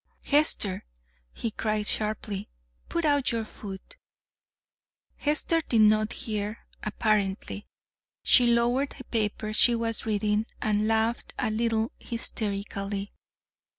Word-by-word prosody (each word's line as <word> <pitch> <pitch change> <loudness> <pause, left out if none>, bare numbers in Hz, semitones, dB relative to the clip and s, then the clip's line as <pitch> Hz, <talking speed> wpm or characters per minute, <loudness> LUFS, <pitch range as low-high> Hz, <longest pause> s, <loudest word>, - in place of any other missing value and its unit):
"Hester," 280 -10 +3 0.5
he 230 - -4
cried 215 -1 -1
sharply, 210 -2 -1 0.4
"put 340 -1 -1
out 285 -3 +3
your 230 -1 -1
foot." 210 - -9 1.2
Hester 305 +2 +1
did 230 -7 +2
not 215 0 +4
hear 210 0 -4 0.2
apparently. 210 -1 -1 0.6
She 245 -2 +6
lowered 240 +4 +2
the 260 - -9
paper 215 -2 -2
she 235 +2 +4
was 230 -1 -2
reading 210 +1 +1
and 215 0 +1
laughed 225 +1 0
a 220 - 0
little 225 0 0
hysterically. 200 -3 -3
220 Hz, 110 wpm, -27 LUFS, 210-235 Hz, 1.2 s, She